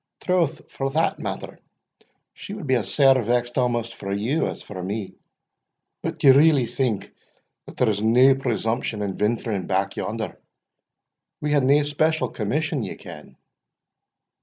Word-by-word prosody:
"Troth, 170 -4 0
for 135 0 -2
that 160 +4 0
matter, - - -6 0.7
she 205 - -8
would 205 -7 -7
be 130 - +1
as 115 -7 0
sair 135 -3 +5
vexed 120 +2 0
amaist 120 -2 0
for 100 -3 -6
you 115 +11 0
as - - -6
for 95 -3 -8
me. 100 +2 -4 0.9
But - - -4
d'ye 135 - +7
really 140 -1 +5
think 115 -4 -2 0.7
there's 110 -4 +1
nae 125 +5 +6
presumption 115 -4 -2
in 100 -2 -3
venturing 105 -3 -1
back 95 0 0
yonder? 110 0 -4 1.0
We 150 - -2
hae 145 - +4
nae 140 +2 +4
special 155 +2 0
commission, 150 +6 -2
ye 100 - -5
ken." - - -12
125 Hz, 140 wpm, -23 LUFS, 105-145 Hz, 1.0 s, d'ye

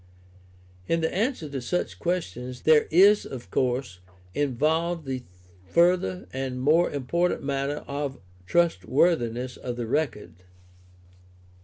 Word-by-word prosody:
In 165 0 +1
the 160 - 0
answer 215 - -1
to 140 -2 -5
such 180 +9 -2
questions 125 - -3
there 155 -1 +5
is, 200 +5 +6
of 120 -8 -9
course, 125 -7 -1 0.3
involved 155 +5 0
the 130 -1 -3 0.5
further 170 - +2
and 130 -1 -3
more 155 +6 +3
important 170 +7 -1
matter 140 +1 -2
of 140 -1 -3
the - - -19 0.3
trustworthiness 125 - +1
of 125 -1 -5
the 120 -1 -3
record. 115 - -2
140 Hz, 120 wpm, -26 LUFS, 125-170 Hz, 0.5 s, is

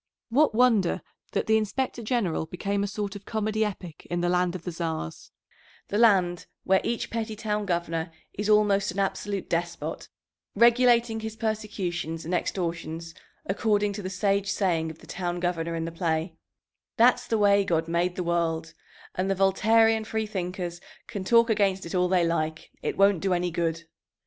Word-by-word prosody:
What 275 0 +3
wonder 225 -8 +3 0.3
that - - 0
the 220 0 +4
Inspector 240 +3 -2
General 210 -9 -1
became 200 +4 -2
a - - -1
sort 205 0 -4
of 200 - -8
comedy 215 0 0
epic 185 -6 -6
in 175 - -1
the 175 - +1
land 180 0 +1
of 180 - -6
the 180 - -4
Czars, 160 - -4 0.6
the 205 - 0
land 185 -6 +3 0.2
where 190 0 +3
each 235 0 -2
petty 225 -1 -3
town 210 -1 -2
governor 170 -1 -1 0.2
is 205 +1 -3
almost 210 -1 +4
an 180 - -5
absolute 195 0 -2
despot, 170 0 -3 0.5
regulating 235 0 +4
his 220 0 -5
persecutions 200 -7 -3
and 175 - -3
extortions 170 -2 -3 0.3
according 205 +1 +1
to 205 - -5
the 185 - -4
sage 195 +1 0
saying 165 -5 0
of 160 - -9
the - - -16
town 175 -1 -3
governor 170 -2 -1
in 165 0 -2
the 165 - -4
play, 165 0 -1 0.6
"That's 245 +1 +4
the 225 - +1
way 200 -1 +4
God 165 -3 0
made 175 +2 0
the 180 - -2
world, 165 -1 -1 0.4
and 185 +1 -1
the 195 - +2
Voltairean 220 +4 +4
free 220 0 -2
thinkers 180 -3 -4 0.2
can 200 - -5
talk 230 +3 +5
against 200 -4 +1
it 170 - -7
all 180 -1 +2
they 180 -2 +3
like, 160 -1 -2
it - - -3
won't 195 -3 +4
do 195 -2 +1
any 175 0 -1
good." 165 0 -1
190 Hz, 175 wpm, -27 LUFS, 170-215 Hz, 0.6 s, talk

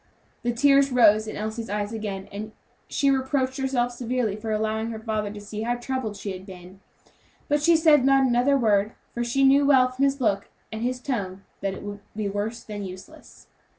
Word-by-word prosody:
The 240 - 0
tears 275 +2 +4
rose 220 -3 +5
in - - -5
Elsie's 220 +2 -4
eyes 205 +1 -2
again, 200 -3 -5
and 215 +2 -7 0.3
she 280 -1 +2
reproached 265 0 0
herself 255 -2 0
severely 240 -3 -2
for 220 +1 -5
allowing 220 +1 -1
her 225 - -5
father 215 -2 -2
to 210 - -8
see 210 +1 -7
how 240 +2 0
troubled 240 -4 -4
she 200 - -5
had 185 0 -7
been; 185 -1 -12 0.7
but 295 -1 +1
she 335 +3 +5
said 315 -4 +5
not 270 0 +4
another 255 +3 +3
word, 210 -4 +2 0.2
for 240 - -2
she 240 +3 0 0.2
well 275 -2 +5
knew 255 - -1
from 260 +2 -1
his 275 0 +2
look 200 -5 0 0.2
and 245 +3 -3
tone 195 -8 -3 0.2
that 195 -1 -2
it - - -9
would 205 0 -6 0.2
be 215 -1 -2
worse 205 +4 -3
than 205 -2 -6
useless. 185 0 -11
225 Hz, 195 wpm, -25 LUFS, 205-260 Hz, 0.7 s, rose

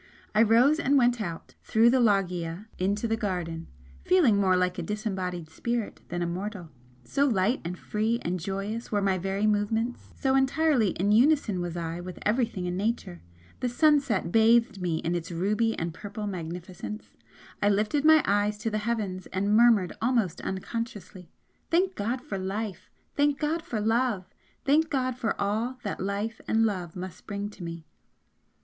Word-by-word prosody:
I 215 - +4
rose 240 +8 +5
and 285 -3 +3
went 240 -2 +3
out, 170 -5 -6
through 230 +2 +4
the 260 - +3
loggia 185 -4 +1
into 200 +5 0
the 225 - +1
garden 175 -7 -3 0.4
feeling 315 - +4
more 190 -2 +3
like 180 0 0
a - - -1
disembodied 185 -3 -3
spirit 235 +7 -3
than 175 0 -2
a - - 0
mortal, 180 0 -5 0.3
so 280 - +1
light 220 +1 +1
and 175 +2 -4
free 220 +5 -1
and 180 +1 -1
joyous 195 +6 -4
were 205 - +2
my 190 -1 +1
very 195 +3 -1
movements 220 +3 0
so 265 -1 +2
entirely 270 -3 +3
in 200 +3 +2
unison 235 - +3
was 175 -1 -4
I 170 0 -4
with 180 0 -8
everything 220 -4 0
in 180 0 -2
Nature. 200 - -2 0.4
The 250 - -1
sunset 275 - +2
bathed 225 -1 +4
me 170 -3 0
in 170 +2 -2
its 170 0 -3
ruby 210 +6 0
and 165 0 -3
purple 210 +3 -6
magnificence, 180 +2 -6 0.6
I 205 - +4
lifted 210 +8 +1
my 315 -1 +7
eyes 205 +1 +1
to 220 +2 -3
the 215 - 0
heavens 210 -4 -3
and 200 +3 0
murmured 225 -6 +5
almost 230 -7 +1
unconsciously 190 -2 -5 0.4
"Thank 370 +3 +2
God 240 - -2
for 230 -10 -4
Life! 195 +1 -4 0.3
Thank 290 -1 +2
God 315 +2 -1
for 230 -8 -4
Love! 225 -2 +1 0.4
Thank 310 +3 +3
God 255 -3 0
for 235 -2 -2
all 220 +6 -1
that 205 - -4
Life 200 +3 -3
and 225 0 +3
Love 180 -6 -3
must 185 -1 -8
bring 205 0 -4
to 190 - -11
me!" 170 -1 -7
210 Hz, 170 wpm, -27 LUFS, 185-235 Hz, 0.6 s, my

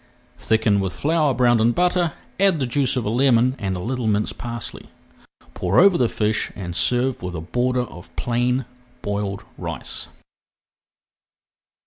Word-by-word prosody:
Thicken 110 -2 +2
with 95 -2 -2
flour 155 -1 +1
browned 120 -3 +4
in 115 +2 +3
butter, 175 0 +1 0.3
add 195 -4 +4
the 135 - 0
juice 130 +1 0
of 125 - -1
a - - 0
lemon 125 0 +3
and 95 -2 -2
a - - -4
little 120 +4 -2
minced 105 0 0
parsley. 120 -2 -6 0.7
Pour 90 +2 0
over 195 +1 +6
the 125 -7 +2
fish 105 0 0
and 90 -3 -6
serve 125 +7 +1
with 90 -1 -5
a - - -3
border 125 +8 0
of 90 -6 -12
plain 125 +1 0 0.4
boiled 100 -1 -3 0.2
rice. - - -5
120 Hz, 150 wpm, -22 LUFS, 105-130 Hz, 0.7 s, over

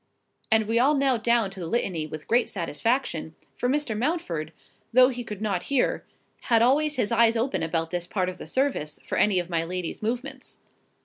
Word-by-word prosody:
And 220 -1 +4
we 230 +1 +2
all 280 +5 +4
knelt 265 -5 +1
down 235 -4 +2
to 195 - -10
the 170 - -4
Litany 170 -6 -1
with 155 0 -8
great 240 +1 +2
satisfaction; 170 - -2 0.2
for 245 - -1
Mr. 285 -5 0
Mountford, 210 - -2 0.4
though 255 +2 +6
he 245 -2 -4
could 210 -2 -7
not 195 -4 -1
hear, 275 -3 +1 0.4
had 230 -1 +4
always 290 +4 +3
his 245 -4 0
eyes 230 0 +4
open 250 +4 0
about 165 0 -1
this 175 -1 -2
part 185 -3 -1
of 185 0 -5
the - - -8
service, 260 - -1
for - - -3
any 205 -3 +4
of 175 -1 0
my 165 -2 0
lady's 180 0 -4
movements. 255 +4 -4
225 Hz, 195 wpm, -26 LUFS, 175-255 Hz, 0.4 s, though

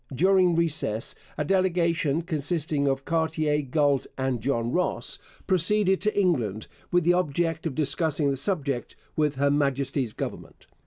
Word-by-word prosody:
During 185 +2 +4
recess 155 -10 +1 0.2
a 150 - -1
delegation 170 -4 +1
consisting 150 -2 -1
of 135 0 -1
Cartier, 160 -2 0
Galt, 140 -1 +1
and 130 -3 -1
John 120 -2 -1
Ross 180 +4 -1 0.3
proceeded 190 +1 +2
to 210 -1 0
England 120 - 0 0.3
with 175 -1 +3
the 175 +2 +4
object 165 -1 0
of 140 - -5
discussing 150 -1 +1
the - - -1
subject 140 -5 -2 0.2
with 150 -2 +1
Her 140 +1 +2
Majesty's 140 -4 0
government. - - -7
155 Hz, 140 wpm, -26 LUFS, 140-175 Hz, 0.3 s, During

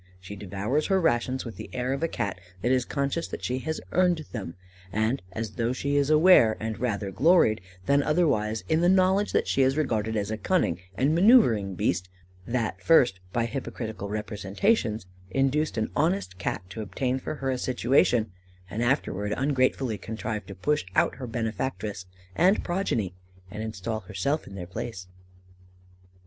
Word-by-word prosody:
She 90 +2 -9
devours 105 +9 -2
her 195 -1 +3
rations 130 -4 +1
with 115 - -7
the - - -8
air 130 +1 -1
of 135 - -3
a 165 - +2
Cat 100 - -3 0.2
that 120 - +2
is 130 -1 +2
conscious 140 +4 -1
that - - -7
she 125 +1 -1
has 160 +4 -3
earned 175 -3 +2
them, 95 -8 -5 0.4
and 110 +6 0
as 110 +1 -4
though 120 +1 +1
she 140 +2 -1
is 145 0 +2
aware, 155 -8 +6
and 110 -1 -4
rather 105 -5 -2
gloried 135 - +4 0.2
than 140 0 +4
otherwise, 140 -9 +1
in 160 +1 +2
the 175 - +4
knowledge 190 +2 +3
that - - +1
she 135 - +2
is 135 +2 +3
regarded 110 -7 0
as 100 0 -2
a 110 - -3
cunning 180 - +1 0.2
and 145 +4 +2
manœuvring 125 - +5
beast, 90 +2 0 0.4
that 115 -2 -2
first, 125 -12 +4
by 120 +2 0
hypocritical 110 -4 -5
representations, 105 - 0 0.2
induced 135 +8 +1
an 110 - -1
honest 150 - 0
Cat 95 - -2
to 110 - -5
obtain 125 +5 -2
for 145 - -5
her 135 -2 -2
a 130 - -1
situation, 120 -3 +2 0.4
and 110 - -3
afterwards 105 -5 0
ungratefully 130 -4 +1
contrived 110 -2 -5
to 95 - -8
push 150 +11 0
out - - +2
her 130 -2 -6
benefactress 110 -4 -3 0.3
and 185 +5 +3
progeny, 145 - -1 0.4
and 105 - -5
install 110 0 -3
herself 145 +6 -2
in 100 - -10
their 90 -2 -5
place." 105 0 -6
120 Hz, 170 wpm, -27 LUFS, 105-145 Hz, 0.4 s, aware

